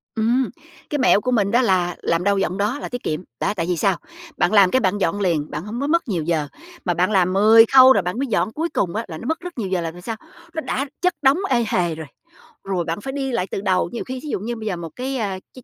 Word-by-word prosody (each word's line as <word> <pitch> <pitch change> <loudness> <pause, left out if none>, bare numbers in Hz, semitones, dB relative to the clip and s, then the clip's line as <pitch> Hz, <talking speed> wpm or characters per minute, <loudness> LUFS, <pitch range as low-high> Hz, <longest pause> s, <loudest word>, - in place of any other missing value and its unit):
Ừm. 235 +3 +1 0.4
Cái 295 - -1
mẹo 250 -5 +4
của 255 - -1
mình 205 -5 +2
đó 240 - +4
là 180 -6 +1
làm 170 +1 0
đâu 200 +1 +2
dọn 190 -1 -1
đó 210 +8 -1
là - - -6
tiết 245 0 -6
kiệm, 155 - -2 0.2
đó, - - 0
tại 165 - -1
vì 175 - 0
sao? 190 +2 +2 0.4
Bạn - - +2
làm 195 -3 +6
cái 260 - +3
bạn 205 -4 +1
dọn 200 0 0
liền, 165 -6 0
bạn 150 +4 -5
hông 230 +4 -5
có 280 - -1
mất 335 0 +1
nhiều 180 -8 -1
giờ, 155 -2 0 0.4
mà 175 - +1
bạn 180 +4 +1
làm 185 -2 +3
10 220 +3 +7
khâu 260 0 +9
rồi - - +2
bạn 180 +7 -3
mới 275 - -1
dọn, 220 -1 0
cuối 330 +2 -2
cùng 180 - -1
á 225 +2 -2
là 160 -4 -7
nó 225 - -9
mất 320 +2 -1
rất 355 -3 -9
nhiều 205 -5 -3
giờ 185 -2 0
là 165 -1 -3
vì 175 +2 -12
sao? 225 +5 -4 0.4
Nó 320 - -3
đã 275 -2 -2 0.2
chất 360 -1 +2
đống 270 +2 +4
ê 240 -3 +2
hề 175 -5 0
rồi, 160 -1 -8 0.6
rồi 185 -3 -2
bạn 165 +4 -3
phải 265 +5 -5
đi 270 -1 -2
lại 230 -6 -1
từ - - -3
đầu, 185 -2 +1
nhiều 235 - -3
khi 260 0 -6
thí 305 - -6
dụ - - -1
như 235 +5 -4
bây 220 -1 -6
giờ 195 - -1
một 170 -1 -6
cái, 265 +2 -3
a, 200 -5 -2
cái 255 - -13
205 Hz, 290 wpm, -21 LUFS, 180-255 Hz, 0.6 s, khâu